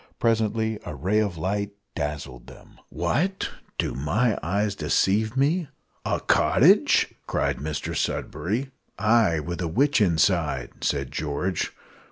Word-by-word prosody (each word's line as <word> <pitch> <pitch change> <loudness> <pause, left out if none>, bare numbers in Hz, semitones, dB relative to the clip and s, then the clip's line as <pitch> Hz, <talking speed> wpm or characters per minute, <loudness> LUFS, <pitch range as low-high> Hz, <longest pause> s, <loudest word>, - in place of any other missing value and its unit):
Presently 110 -1 +1
a - - -6
ray 95 +10 +1
of 100 -5 -1
light 100 +4 -2 0.2
dazzled 75 -5 -5
them. - - -15
"What! 190 +5 -1 0.3
do - - -1
my 105 - +1
eyes 100 +4 0
deceive 100 - +1
me 155 +5 +2 0.4
a - - 0
cottage?" - - +4
cried 70 -3 0
Mr 75 +2 -4
Sudberry. 120 +9 -2 0.3
"Ay, 110 -4 +3
and 85 +2 -4
a 85 - -1
witch 135 - +2
inside," 80 -8 +1
said 70 -3 -1
George. 80 +5 -2
100 Hz, 125 wpm, -25 LUFS, 75-110 Hz, 0.4 s, cottage